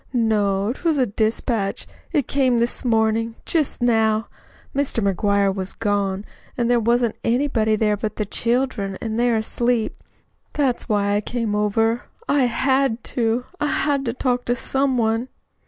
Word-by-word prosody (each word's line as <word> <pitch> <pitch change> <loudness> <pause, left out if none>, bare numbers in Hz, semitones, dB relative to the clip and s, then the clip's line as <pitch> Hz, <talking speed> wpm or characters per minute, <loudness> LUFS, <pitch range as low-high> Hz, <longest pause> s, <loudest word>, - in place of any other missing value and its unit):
"No, 210 -3 +1
'twas 320 +1 0
a 260 - +3
dispatch. 215 -1 -1 0.3
It 290 -7 +1
came 260 -3 +2
this 235 +1 0
mornin'. 225 -1 +1
Just 305 -6 0
now. 220 -2 +2 0.5
Mr. 230 -8 +1
McGuire 200 0 +2
was 190 -1 -5
gone, 200 -2 -1 0.3
an' 240 -1 +1
there 245 -1 +4
wasn't 235 0 +1
anybody 230 -3 +1
there 210 -1 +2
but 210 0 -4
the 210 - -2
children, 230 -3 -1
an' 220 -1 -3
they're 240 -1 +2
asleep. 235 +1 0 0.6
That's 265 -5 0
why 205 -1 +2
I 205 - +1
came 230 -1 -2
over. 225 +3 +1 0.2
I 280 -3 +3
HAD 260 0 +1
to. 235 +1 0
I 295 - +1
had 285 -2 +1
to 230 - -1
talk 250 -1 -1
to 245 - +1
some 265 +1 0
one!" 225 +2 0
230 Hz, 155 wpm, -22 LUFS, 215-250 Hz, 0.6 s, there